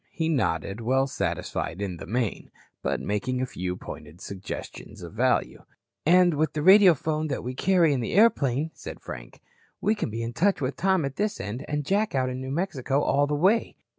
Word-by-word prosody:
He 160 -1 -2
nodded, 100 - -1
well 130 +4 +2
satisfied 95 -9 -3
in 95 -4 -3
the - - -9
main, 115 +1 -2 0.3
but - - -1
making 115 +5 -2
a 130 - 0
few 90 -7 -4
pointed 75 -1 -10
suggestions 100 -1 -8
of - - -9
value. - - 0 0.4
"And 180 0 +6
with 155 +1 0
the 150 - -2
radiophone 165 -5 +5
that 140 - -3
we 125 +2 -4
carry 170 +1 +3
on 135 - 0
the 115 - -3
airplane," 155 - +3
said - - -9
Frank, - - -9 0.4
"we 210 - +2
can 210 - -3
be 115 +2 -4
in 115 +1 -4
touch 190 +10 +2
with 135 -1 -2
Tom 190 -4 +2
at 135 0 -5
this 210 0 -1
end 110 +7 -5
and 150 -1 -2
Jack 205 +1 +1
out 130 -1 +1
in 130 +1 -5
New 130 - -5
Mexico 145 -3 -1
all 145 +1 +2
the 150 - 0
way. 195 +9 +2
140 Hz, 195 wpm, -26 LUFS, 115-170 Hz, 0.4 s, And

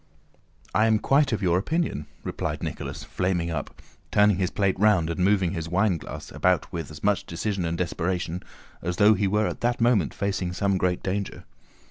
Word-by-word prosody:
"I 110 +1 +4
am 110 -1 +4
quite 140 +5 +3
of 110 -2 -1
your 90 -1 +3
opinion," 155 - -1 0.2
replied - - -3
Nicholas, - - -5
flaming 90 -2 -1
up, 75 -3 -5 0.3
turning 105 -2 +4
his 95 -2 0
plate 100 -2 0
round 100 -6 +4
and 85 - -4
moving 95 -3 +3
his 85 -3 -4
wineglasses 90 -1 -1
about 90 -1 +1
with 85 -4 -4
as 75 - -11
much 100 -2 +2
decision 90 +2 -2
and 85 +1 -2
desperation 90 0 -2 0.4
as 90 +1 -3
though 105 +1 +6
he 100 -1 +1
were 105 +2 +2
at - - -4
that 120 0 +1
moment 115 - +2
facing 95 -3 -2
some 100 +1 +1
great 90 -1 0
danger. 95 +1 -3
95 Hz, 180 wpm, -26 LUFS, 85-105 Hz, 0.4 s, though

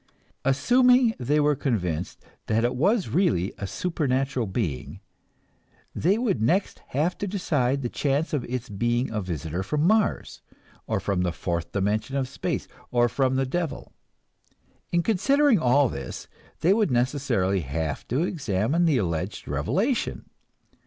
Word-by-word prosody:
Assuming 245 - +4
they 145 +5 +1
were 150 0 +3
convinced 90 - -2 0.2
that 110 +1 +1
it 120 - 0
was 195 - +2
really 165 - +1
a 100 - -3
supernatural 135 - -1
being, 95 - -3 0.9
they 190 +6 +2
would 220 - 0
next 175 - +1
have 155 +7 0
to 205 - -2
decide 140 -9 0
the - - 0
chances 145 +6 -1
of 145 -5 0
its 125 0 -4
being 120 +4 -1
a 105 -1 -2
visitor 85 -1 -4
from 150 +10 0
Mars, 215 +2 +1 0.5
or - - 0
from 100 -3 -1
the 90 -1 0
fourth 85 -1 -3
dimension 105 +6 -1
of 135 -2 0
space, 135 - -3 0.2
or 120 -1 +3
from 130 +1 +1
the 135 0 +1
devil. 165 +3 -3 1.0
In 170 0 +2
considering 250 - +3
all 140 0 +4
this, 70 - -6 0.3
they 180 +4 +5
would 215 -1 +2
necessarily 120 -7 +1
have 80 0 -3
to 130 +7 0
examine 140 - 0
the 155 -5 +3
alleged 85 -7 -2
revelation. 185 - -1
130 Hz, 145 wpm, -25 LUFS, 100-170 Hz, 1.0 s, they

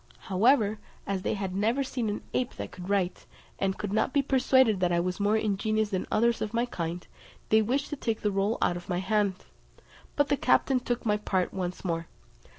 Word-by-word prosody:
However, 215 +1 +3 0.3
as 195 -1 -2
they 200 - -1
had 195 -2 -3
never 225 +7 +1
seen 245 -4 -2
an 205 - -4
ape 250 - -1
that - - -6
could 180 +1 -9
write, 195 -3 -1 0.3
and 190 0 0
could 205 -1 -4
not 220 +4 +1
be 285 -1 +3
persuaded 260 -5 +3
that 180 -1 +2
I 170 - +2
was 180 +2 -2
more 205 +2 +3
ingenious 215 0 0
than 185 -2 -2
others 235 +1 +2
of 215 +1 -3
my 235 +1 +2
kind, 175 -6 -4 0.4
they 220 0 +5
wished 260 +6 -1
to - - -1
take 225 -5 -2
the 210 - +1
roll 200 +3 0
out 175 - +2
of 175 - -11
my 175 - 0
hand; 200 +1 +1 0.8
but 290 -1 +2
the 285 - +2
captain 255 +1 +3
took 245 -1 -3
my 210 -1 +2
part 190 -3 -1
once 180 0 -4
more. 165 -2 -2
210 Hz, 210 wpm, -28 LUFS, 190-235 Hz, 0.8 s, they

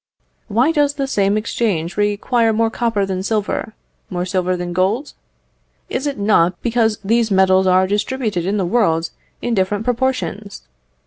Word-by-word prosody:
Why 235 +8 +2
does 290 -2 +1
the 275 -2 -1
same 205 -5 +1
exchange 205 -6 -1
require 210 +3 +1
more 225 +1 +1
copper 225 -5 0
than 190 -1 -3
silver, 215 +1 -2 0.3
more 180 -1 -2
silver 185 -1 -1
than 175 0 -4
gold? 200 - 0 0.8
Is 265 +3 -2
it 285 - -3
not 185 -4 +2
because 225 -3 +1
these 225 +2 +2
metals 190 -1 +4
are 185 0 +4
distributed 210 -2 -1
in 205 +2 0
the 190 - 0
world 170 -6 +1 0.3
in 240 - -1
different 200 +1 0
proportions? 245 -5 -2
205 Hz, 150 wpm, -19 LUFS, 185-235 Hz, 0.8 s, metals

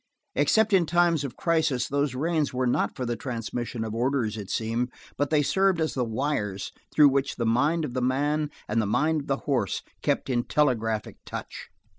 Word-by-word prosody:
Except 220 -1 +3
in 180 -4 +4
times 175 -3 +3
of 140 - -6
crisis 160 -7 +1
those 140 -2 0
reins 155 +1 0
were 130 0 -1
not 120 - +1
for 125 - -3
the 120 0 -1
transmission 120 -1 -4
of 110 - -4
orders, 120 -2 0
it 105 -3 -7
seemed, 115 +2 -1 0.2
but 145 -1 0
they 150 -2 +3
served 190 +3 +2
as 160 -1 0
the 130 - 0
wires 110 -5 -2 0.2
through 150 -2 +7
which 135 0 0
the 115 - -2
mind 145 +8 +2
of 125 - -6
the 130 - -1
man 145 +4 +1 0.2
and 115 +2 +1
the 105 - -1
mind 155 +8 +1
of 140 - -12
the 135 - +1
horse 125 -9 0 0.2
kept - - 0
in 120 -3 +1
telegraphic 115 -7 0
touch. - - -7
135 Hz, 195 wpm, -26 LUFS, 115-150 Hz, 0.2 s, through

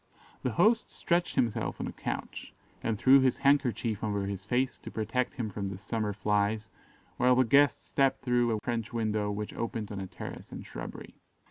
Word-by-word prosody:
The 125 - -1
host 220 - +3
stretched 175 0 0
himself 115 -2 0
on - - -2
a - - -4
couch, - - -5 0.3
and 115 -2 -1
threw 135 +5 +7
his 130 -1 +3
handkerchief 120 -6 +2
over 100 -2 -1
his 100 -1 -4
face 125 +4 0
to - - -8
protect 115 +3 -1
him 110 -4 -3
from 100 0 -3
the 95 - -6
summer 105 +2 -2
flies, 105 +2 0 0.5
while 125 +1 +5
the 130 - +5
guest 140 +5 +4
stepped 135 -1 +1
through 120 -1 +3
a 110 - 0
French 115 -2 -2
window 110 -3 0
which 105 +1 -4
opened 115 -2 -4
on 100 - -4
a 95 - -4
terrace - - -8
and - - -7
shrubbery. - - -8
115 Hz, 190 wpm, -30 LUFS, 105-125 Hz, 0.5 s, threw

